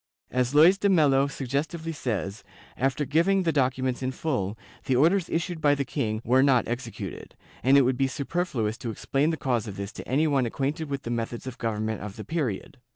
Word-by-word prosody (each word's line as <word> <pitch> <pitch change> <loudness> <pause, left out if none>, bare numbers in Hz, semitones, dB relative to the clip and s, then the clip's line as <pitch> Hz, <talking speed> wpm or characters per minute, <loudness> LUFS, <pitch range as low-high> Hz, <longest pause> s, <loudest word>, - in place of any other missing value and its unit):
As 125 +2 0
Luys 175 +6 +7
de 200 - +2
Melo 140 -6 +4
suggestively 145 +5 -3
says, 110 - -3 0.3
after 135 +3 0
giving 185 +7 +2
the 165 - +2
documents 130 -3 0
in 130 0 -1
full, 120 -8 -2 0.3
the 130 - +1
orders 170 +7 +3
issued 170 0 -2
by 145 -1 +4
the 140 -1 -2
king 110 -6 -2
were 130 +2 +4
not 135 -4 +3
exe 120 +2 -3
cuted, - - -8 0.3
and 135 +2 +5
it 140 - +6
would 130 0 +1
be 135 - +2
superfluous 135 -6 -2
to 120 - -4
explain 135 +6 0
the 160 - -1
cause 120 -6 -1
of 100 - -7
this 100 +1 -5
to - - -9
any 145 +5 +2
one 140 -5 +2
acquainted 145 +6 -2
with 140 -1 -3
the 120 - -4
methods 115 +1 -3
of 130 -2 -7
government 110 -1 -2
of 100 0 -7
the 110 - -8
period. 135 - -3
135 Hz, 210 wpm, -26 LUFS, 120-155 Hz, 0.3 s, Luys